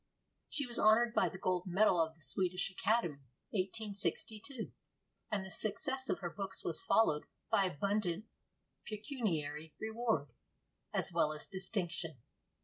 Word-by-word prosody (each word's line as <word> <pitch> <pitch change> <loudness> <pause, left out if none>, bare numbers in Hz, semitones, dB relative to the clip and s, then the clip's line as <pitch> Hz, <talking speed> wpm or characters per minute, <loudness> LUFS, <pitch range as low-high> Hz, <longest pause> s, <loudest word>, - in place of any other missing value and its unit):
She 285 - 0
was 240 -1 -3
honored 230 +2 +6
by - - +4
the 190 - -8
gold 185 0 0
medal 180 -1 +5
of 160 0 0
the 160 - -17
Swedish 180 +8 0
Academy 190 -7 +1 0.3
(1862), 215 +4 -2 0.6
and 200 -3 -1
the 190 - -8
success 260 +5 0
of - - 0
her 175 - -2
books 195 0 -3
was 165 - -1
followed 155 -9 +4 0.3
by 195 - +5
abundant 195 +2 0 0.6
pecuniary 170 - -2
reward 220 -9 0 0.6
as - - +1
well 155 - +3
as 150 - -5
distinction. 175 - -2
195 Hz, 135 wpm, -36 LUFS, 170-220 Hz, 0.6 s, honored